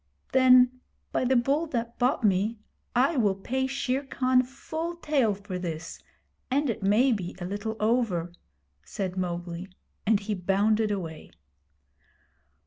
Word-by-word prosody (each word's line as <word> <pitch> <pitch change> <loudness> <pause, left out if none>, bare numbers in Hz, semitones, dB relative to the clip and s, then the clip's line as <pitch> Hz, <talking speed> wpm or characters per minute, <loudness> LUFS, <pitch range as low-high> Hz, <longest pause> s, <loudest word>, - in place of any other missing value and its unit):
'Then, 255 -1 +5 0.3
by - - 0
the 260 +1 +2
Bull 275 +7 +2
that 235 -4 -4
bought 250 0 +1
me, 205 +3 +2 0.4
I 270 +5 +3
will 205 -5 +3
pay 260 +7 -2
Shere 265 0 -1
Khan 255 -1 +2
full 315 +6 -5
tale 275 -10 +1
for 195 -2 -6
this, 165 -2 -5 0.5
and 275 0 +1
it 220 - -6
may 215 +7 +4
be 185 -6 -2
a 180 - -5
little 205 +4 -3
over,' 215 -7 0 0.5
said 185 - -4
Mowgli; 175 0 -4 0.4
and 215 -1 +4
he 210 +1 -2
bounded 205 +4 +2
away. 170 -6 -5
220 Hz, 135 wpm, -27 LUFS, 190-255 Hz, 0.5 s, Then